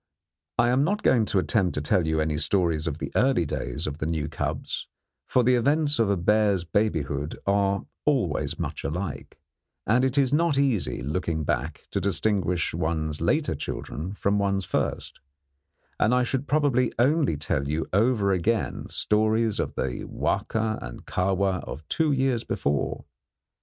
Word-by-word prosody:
I 120 - +4
am 130 +3 +3
not 205 +7 0
going 115 -4 +4
to 100 - -1
attempt 95 -1 +1
to 75 - -1
tell 80 +3 +1
you 80 0 +1
any 75 -1 0
stories 85 -1 +1
of 75 -2 -2
the 80 - -5
early 130 -10 +3
days 70 +1 -3
of 75 0 -4
the 75 - -2
new 80 -2 -1
cubs, - - -3 0.4
for 125 - +3
the 125 +2 +4
events 145 +3 +2
of 110 -3 +3
a 100 - +2
bear's 100 0 +2
babyhood 80 -6 -1
are 100 0 +1 0.2
always 125 - 0
much - - -4
alike, 90 +7 -4 0.5
and 120 +4 +3
it 130 +1 +1
is 135 -1 +3
not 160 -1 +2
easy, 130 - 0
looking 80 +2 -2
back, - - -2
to 100 - -1
distinguish 90 -2 0
one's 80 -2 -2
later - - +1
children 90 +7 -5
from 100 0 +1
one's 100 -2 0
first; - - -2 0.8
and 115 +4 +3
I 125 - +3
should 130 +2 -2
probably 140 -5 +2
only 135 - +2
tell 75 -1 -1 0.3
over 105 -1 +3
again 105 +5 -1
stories 110 +1 +1
of - - -2
the 65 -1 -2
Wahka 110 -1 -1
and - - -8
Kahwa 95 0 0
of 75 +2 -8
two 160 -2 +2
years 130 -4 +1
before. 70 0 -2
100 Hz, 160 wpm, -26 LUFS, 80-125 Hz, 0.8 s, I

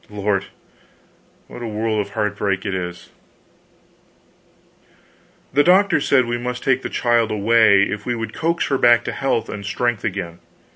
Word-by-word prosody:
Lord, 105 -1 -1 1.0
what - - -10
a 120 - -4
world 110 0 -2
of 105 - -4
heart 105 -1 -1
break 100 -1 -2
it 100 - -2
is. 90 -1 -6 2.4
The 145 +2 +4
doctors 190 +3 +3
said 130 -3 +4
we 120 0 -3
must 125 0 -5
take 130 -1 +1
the - - -5
child 120 -2 +1
away, 105 -1 +4
if 105 +1 -3
we 120 +1 -2
would 115 -1 -5
coax 170 +1 -1
her 135 -2 0
back 120 0 +5
to - - -4
health 135 -5 -1
and 100 - -7
strength 120 +3 -2
again. 90 -5 -4
115 Hz, 160 wpm, -20 LUFS, 100-125 Hz, 2.4 s, back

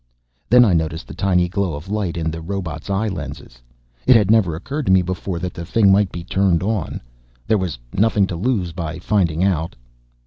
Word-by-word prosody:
Then 125 0 +7
I 100 - +3
noticed 80 0 -1
the - - -9
tiny 90 -2 +1
glow 95 -2 -2
of 75 +5 -9
light 100 -4 -2
in 80 -1 -1
the 80 +1 -6
robot's 85 -3 -5
eye 100 +3 0
lenses. 70 - -7 0.5
It 130 - +7
had 105 -2 +4
never 100 -8 +3
occurred 140 - -5
to - - +4
me 95 -1 +5
before 90 0 -4
that 90 +1 -4
the 85 - -7
thing 100 +3 +3
might 100 -1 +3
be 85 - -6
turned 95 -1 +1
on. 105 -3 -2 0.4
There 110 - +2
was 90 -8 -3 0.2
nothing 105 -1 +3
to 90 - -5
lose 95 -2 -1
by 80 -2 -5
finding 85 -3 0
out. 85 -4 0
90 Hz, 205 wpm, -20 LUFS, 85-100 Hz, 0.5 s, Then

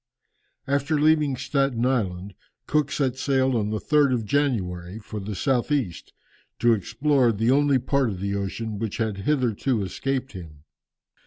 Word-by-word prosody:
After 140 +2 0
leaving 150 -2 +3
Staten 135 -4 0
Island, 100 -7 -1 0.3
Cook 150 0 +1
set 130 -3 0
sail 130 -1 +1
on 105 -2 0
the 110 - -1
3rd 145 +2 +3
of 115 -3 -3
January, 100 -9 -1
for 110 -1 -7
the 100 +1 -5
south 130 +7 0
east, 125 - -2 0.5
to 120 0 +4
explore 120 +5 +2
the 115 +3 +1
only 140 0 +4
part 130 0 +1
of 95 -4 -5
the 100 +1 -2
ocean 100 +2 -3
which 110 -2 -3
had 110 -3 -1
hitherto 120 -1 0
escaped 135 +7 -3
him. 80 -6 -11
120 Hz, 155 wpm, -24 LUFS, 100-140 Hz, 0.5 s, to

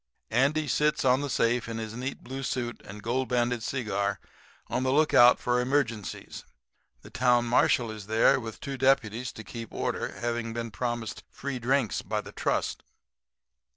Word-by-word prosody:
Andy 140 +6 +2
sits 150 0 +1
on 130 +1 +4
the 145 - -3
safe 115 -1 +1
in 115 - -4
his 110 -1 -5
neat 130 +4 -5
blue 135 +2 -6
suit 120 -2 -3
and 105 +1 -10
gold 130 +3 -1
banded 120 -1 +1
cigar, 100 -5 -1 0.5
on 125 - -1
the 130 0 +1
lookout 135 -4 +6
for 125 0 +1
emergencies. 125 -5 -2 0.6
The - - -13
town 120 -1 +3
marshal 120 -1 +3
is 105 -2 -9
there 110 +4 +4
with 115 -3 -7
two 135 -1 -5
deputies 125 -3 +2
to 110 - -9
keep 115 0 -8
order, - - -2
having 120 -1 -2
been 115 -1 -4
promised 120 +1 -3
free 135 -2 -5
drinks 125 -2 +1
by 105 +2 -2
the 100 - -11
trust. - - -1
120 Hz, 165 wpm, -28 LUFS, 115-130 Hz, 0.6 s, lookout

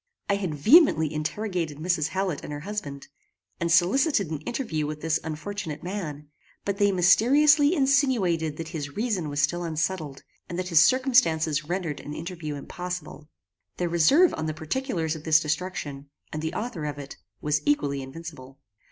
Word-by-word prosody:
I 200 - +3
had 185 -6 -3
vehemently 160 - +5
interrogated 165 0 -3
Mrs. 160 -1 0
Hallet 185 -1 -2
and - - -7
her 145 0 -5
husband, 150 -8 -6 0.5
and 170 0 -1
solicited 195 - +3
an 155 - -3
interview 220 - -2
with 150 0 -6
this 160 0 +1
unfortunate 160 0 -5
man; 165 -6 -5 0.4
but 200 -1 -1
they 205 -1 +3
mysteriously 285 - +5
insinuated 245 - +2
that 165 -1 -6
his 145 -4 -6
reason 210 -9 -1
was 145 0 0
still 175 +4 0
unsettled, 160 -3 -3 0.3
and 175 - -5
that 180 0 -3
his 165 -3 +6
circumstances 165 - +3
rendered 170 -3 -3
an 150 - -7
interview 165 -3 -5
impossible. 175 0 -7 0.5
Their 175 -1 -1
reserve 220 - +5
on 160 - -3
the 155 - -3
particulars 165 - -2
of 155 - -9
this 155 -1 +5
destruction, 150 -3 -4 0.2
and 155 - -3
the 160 0 -3
author 215 -9 -4
of 145 -1 -4
it, 140 -1 -9 0.2
was 150 0 0
equally 145 -1 +1
invincible. 135 -1 -10
165 Hz, 160 wpm, -26 LUFS, 150-200 Hz, 0.5 s, his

